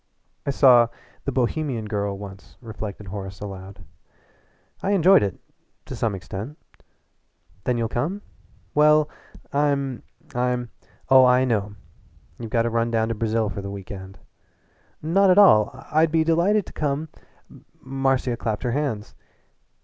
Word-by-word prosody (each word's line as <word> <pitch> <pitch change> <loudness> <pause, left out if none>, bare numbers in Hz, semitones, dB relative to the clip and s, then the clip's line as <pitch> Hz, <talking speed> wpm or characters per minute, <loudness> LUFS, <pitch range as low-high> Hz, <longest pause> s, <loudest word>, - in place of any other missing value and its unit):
"I - - +1
saw 125 -4 +6 0.4
'The 140 - -1
Bohemian 130 -2 -1
Girl' 100 -2 -2
once," 100 -1 -11
reflected 105 -4 -7
Horace 95 -1 -7
aloud. 95 -2 -9 1.0
"I 200 - 0
enjoyed 190 - +6
it 100 -3 -2 0.5
to - - -7
some 110 -3 -1
extent 100 - -7 0.5
" 95 - -38
"Then 125 -1 +1
you'll 115 -1 0
come?" 160 - -3 0.5
"Well, 150 0 +5 0.5
I'm 140 -3 0 0.3
I'm 125 -1 -1 0.2
" - - -32
"Oh, 130 -1 +8
I 125 +1 +5
know 105 -4 -1 0.6
you've 115 - -6
got 115 +1 +2
to 115 - -1
run 115 0 +1
down 115 -1 0
to - - 0
Brazil 110 0 0
for 100 0 -5
the 100 - -6
week 100 -1 -8
end." 95 -1 -9 0.9
"Not 190 +5 +3
at 185 - +5
all. 110 - +7 0.2
I'd 155 +1 +3
be 160 0 +3
delighted 175 +6 +2
to - - -12
come 150 +1 -2 0.4
" - - -20
Marcia 135 -2 0
clapped 110 0 -3
her 120 - 0
hands. 125 -6 -2
120 Hz, 150 wpm, -23 LUFS, 105-145 Hz, 1.0 s, Oh